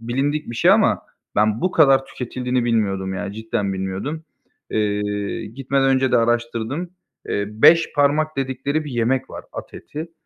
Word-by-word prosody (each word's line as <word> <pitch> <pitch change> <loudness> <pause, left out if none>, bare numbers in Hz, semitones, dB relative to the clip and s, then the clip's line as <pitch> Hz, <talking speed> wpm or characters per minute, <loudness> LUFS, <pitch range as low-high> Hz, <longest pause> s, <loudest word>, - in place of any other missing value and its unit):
bilindik 135 +5 -1
bir 115 - -6
şey - - +5
ama - - +4 0.3
ben 105 +1 +2
bu 185 - +1
kadar 135 -1 +4
tüketildiğini 125 0 -2
bilmiyordum, 100 -5 0
yani, 100 +1 -4
cidden 110 -3 -2
bilmiyordum. 95 +12 -4 0.5
Eee, 105 -1 -1
gitmeden 135 +4 0
önce 130 -1 +2
de - - +6
araştırdım. 120 +7 -1 0.4
Eee, 100 - 0
"beş 165 +10 +5
parmak" 150 +1 +2
dedikleri 135 +3 -1
bir 145 - -6
yemek 125 +3 0
var - - -8
at - - -8
eti, 160 +3 -8
120 Hz, 150 wpm, -21 LUFS, 105-140 Hz, 0.5 s, de